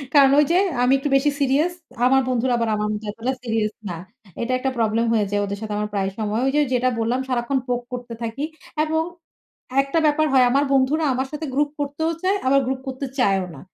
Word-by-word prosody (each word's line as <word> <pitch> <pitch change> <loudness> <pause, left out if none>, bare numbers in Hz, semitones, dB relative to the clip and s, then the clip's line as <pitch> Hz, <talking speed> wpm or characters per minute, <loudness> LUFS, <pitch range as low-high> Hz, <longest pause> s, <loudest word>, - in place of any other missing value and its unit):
কারণ 275 -1 +7
ওই 295 - +5
যে 355 - +4 0.3
আমি 255 +2 +4
একটু 275 +2 -2
বেশি 280 +2 +3
সিরিয়াস। 285 +5 +2 0.3
আমার 265 +1 +5
বন্ধুরা 250 0 +1
আবার 230 -1 0
আমার 210 0 -1
মতো 210 +1 -5
এতটা 240 +5 -3
সিরিয়াস 225 -2 -1 0.2
না। 170 - -4 0.4
এটা 240 +2 -2
একটা 265 - 0
প্রবলেম 225 0 +1
হয়ে 215 -2 +2
যায় 205 0 +1
ওদের 200 0 -4
সাথে 215 -1 -4
আমার 210 0 -2
প্রায় 195 -1 0
সময়। 215 +2 -1
ওই 270 - +2
যে 300 - +4
যেটা 250 +1 +2
বললাম 235 +3 0
সারাক্ষণ 250 +2 0
পোক 245 0 -1
করতে 245 -1 -6
থাকি। 230 +5 -4 0.4
এবং 320 +1 0 0.8
১ 275 - -6
টা 330 - +4
ব্যাপার 305 +1 +3
হয় 255 -1 +6
আমার 280 +2 +3
বন্ধুরা 275 +4 +2
আমার 260 +1 -1
সাথে 305 +1 -4
গ্রুপ 290 +1 +1
করতেও 290 +3 -1
চায়, 385 +2 +2
আবার 275 +1 +5
গ্রুপ 260 0 -1
করতে 265 +1 -4
চায়ও 195 -5 +2
না। - - -11
255 Hz, 220 wpm, -22 LUFS, 225-280 Hz, 0.8 s, কারণ